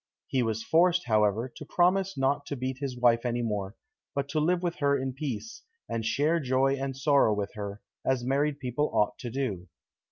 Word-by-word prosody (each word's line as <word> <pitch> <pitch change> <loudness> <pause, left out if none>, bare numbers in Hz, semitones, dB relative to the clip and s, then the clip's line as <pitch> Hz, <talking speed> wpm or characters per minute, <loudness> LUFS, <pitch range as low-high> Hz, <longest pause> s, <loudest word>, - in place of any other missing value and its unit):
He 130 - 0
was 110 -1 -1
forced, 175 +5 +3
however, 110 +1 +2
to 140 +4 -11
promise 185 +3 +2
not 140 +2 +1
to 145 - -3
beat 130 0 -4
his 135 -3 -4
wife 120 -1 +4
any 120 -1 -1
more, 105 -2 -3 0.4
but 140 0 -1
to 155 +2 0
live 175 +3 +1
with 175 -1 -1
her 140 -1 +2
in 130 -1 -3
peace, 140 - -5 0.3
and 115 -1 -2
share 150 +9 +2
joy 135 -1 +2
and 135 -1 -4
sorrow 135 -6 +4
with 100 -1 -3
her, 100 -1 -6 0.2
as 130 -2 +1
married 140 +2 +1
people 130 +3 -1
ought 105 - +1
to 120 - -5
do. 110 -9 -3
130 Hz, 195 wpm, -28 LUFS, 115-145 Hz, 0.4 s, wife